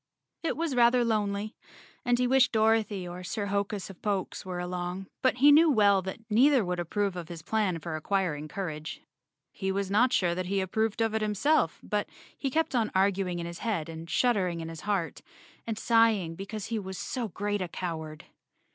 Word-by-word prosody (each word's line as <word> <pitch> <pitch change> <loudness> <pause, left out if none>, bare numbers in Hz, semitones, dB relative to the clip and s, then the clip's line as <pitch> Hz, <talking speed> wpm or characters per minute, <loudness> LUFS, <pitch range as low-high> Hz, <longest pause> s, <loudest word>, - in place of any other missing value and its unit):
It 330 - -2
was 330 -3 -1
rather 240 0 +4
lonely, 210 -1 -1 0.5
and 245 -2 +2
he 250 - +2
wished 260 +1 +4
Dorothy 220 -4 +2
or 175 +1 -7
Sir 200 +3 -3
Hokus 200 0 -2
of 185 - -17
Pokes 200 -3 -2
were 185 -1 -5
along, 180 +1 -4 0.2
but 260 - +3
he 285 +4 +7
well 205 - +4
knew - - -14
that 190 - -4
neither 250 +2 +4
would 180 0 -2
approve 195 +3 -1
of 175 -3 -6
his 165 -2 -8
plan 205 -2 0
for 165 0 -5
acquiring 155 -3 -1
cour¬ 185 -1 -4
age. 155 +1 -8 0.5
He 190 -1 -2
was 195 0 -2
not 240 +5 +4
sure 175 -7 +2
that 180 +1 -3
he 195 +1 0
approved 220 +4 -1
of 225 -1 +1
it 220 - 0
himself, 215 +9 +1
but - - -2 0.3
he 275 - -2
kept 320 +3 0
on 230 -4 +1
arguing 190 -2 +1
in 170 - -4
his 170 0 -7
head 185 -9 -2
and 165 0 -8
shuddering 190 -9 +1
in 165 0 -5
his 165 -1 -8
heart, 195 -5 -2 0.5
and 225 -2 -2
sighing 225 -7 +3
because 200 +4 -6
he 225 -1 -2
was 190 -2 -6
so 235 +6 -3
great 205 +2 -2
a 180 - -2
cow¬ 170 -1 -4
ard. 155 -1 -9
200 Hz, 200 wpm, -29 LUFS, 180-225 Hz, 0.5 s, he